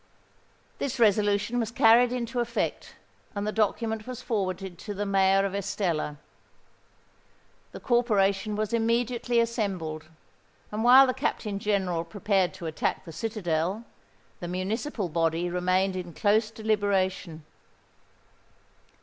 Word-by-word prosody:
This 270 -2 -2
resolution 210 +1 +2
was 225 -2 -1
carried 235 +1 +5
into 245 0 -3
effect; 235 0 -2 0.4
and 200 0 -2
the 210 - -1
document 220 +1 -1
was 255 -2 -6
forwarded 190 -5 -3
to 205 - -6
the 205 +1 -2
Mayor 195 0 +3
of 195 - -3
Estella. 175 -6 -2 1.5
The - - -9
corporation 210 -4 +1
was 215 +1 -2
immediately 235 +1 +1
assembled; 195 -10 -2 0.7
and 215 +1 -2
while 255 +3 +8
the 255 - 0
Captain 215 -6 -2
General 190 -5 0
prepared 190 +1 0
to 180 -3 -8
attack 160 -1 -2
the 165 - -8
citadel, 190 0 -2 0.5
the 175 - -5
municipal 200 - -2
body 165 +1 0
remained 185 +2 +1
in 175 -2 -6
close 215 +1 +2
deliberation. 200 -7 -1
205 Hz, 120 wpm, -27 LUFS, 185-225 Hz, 1.5 s, while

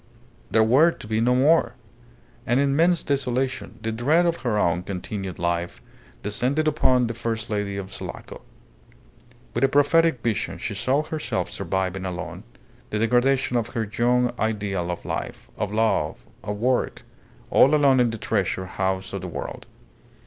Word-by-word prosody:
There 110 - +4
were 135 +9 +5
to 165 - -8
be 110 +1 0
no 125 +2 +3
more. 140 -2 +3 0.7
An 120 - +2
immense 155 +5 +3
desolation, 130 -3 -1
the 115 - -1
dread 145 +10 +2
of 170 -1 +1
her 120 -4 -1
own 85 -3 +2
continued 95 0 -5
life, 85 0 -2 0.4
descended 130 +9 0
upon 130 -5 +3
the 115 - -3
first 115 -1 -4
lady 105 -1 -2
of 100 0 -6
Sulaco. - - -8 1.1
With 120 - -1
a - - +7
prophetic 145 0 +3
vision 115 -3 -1
she 115 - -4
saw 130 +9 +1
herself 150 -7 -3
surviving 95 0 -2
alone 90 -2 -6 0.4
the 105 - -2
degradation 125 +3 +2
of 115 -2 -1
her 115 - +1
young 120 +3 +1
ideal 100 -5 -1
of 90 - -5
life, - - -5
of 105 - -3
love, 110 -8 0 0.2
of 105 0 -4
work 125 +3 0 0.5
all 140 +4 +6
alone 140 -3 +4
in 120 -1 +4
the 115 - -4
Treasure 95 -3 -1
House 95 +1 -2
of 100 - -3
the 90 - -5
World. 85 - -6
115 Hz, 155 wpm, -24 LUFS, 100-130 Hz, 1.1 s, a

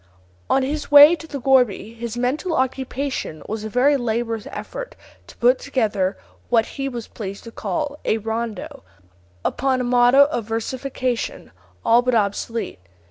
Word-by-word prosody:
On 270 - +3
his 295 +3 -3
way 290 +3 +9
to 325 - -11
the 285 -3 -5
gourbi, 245 -5 +2
his 235 0 -5
mental 295 +8 -1
occupation 260 - -2
was 215 0 -4
a 220 - -4
very 270 +5 +3
laborious 230 -2 -2
effort - - -7 0.3
to - - -15
put 250 +2 +4
together 210 -8 -1 0.3
what 230 -2 +3
he 275 0 -4
was 240 -3 -6
pleased 200 -2 -7
to 230 - -10
call 295 +3 -3
a 220 - +1
rondo, 230 +6 -4 0.6
upon 265 -1 0
a - - -1
model 245 +3 +5
of 235 -7 -2
versification 250 +2 -3 0.3
all 235 +1 +5
but 250 -1 +1
obsolete. 215 - -1
245 Hz, 150 wpm, -22 LUFS, 225-275 Hz, 0.6 s, way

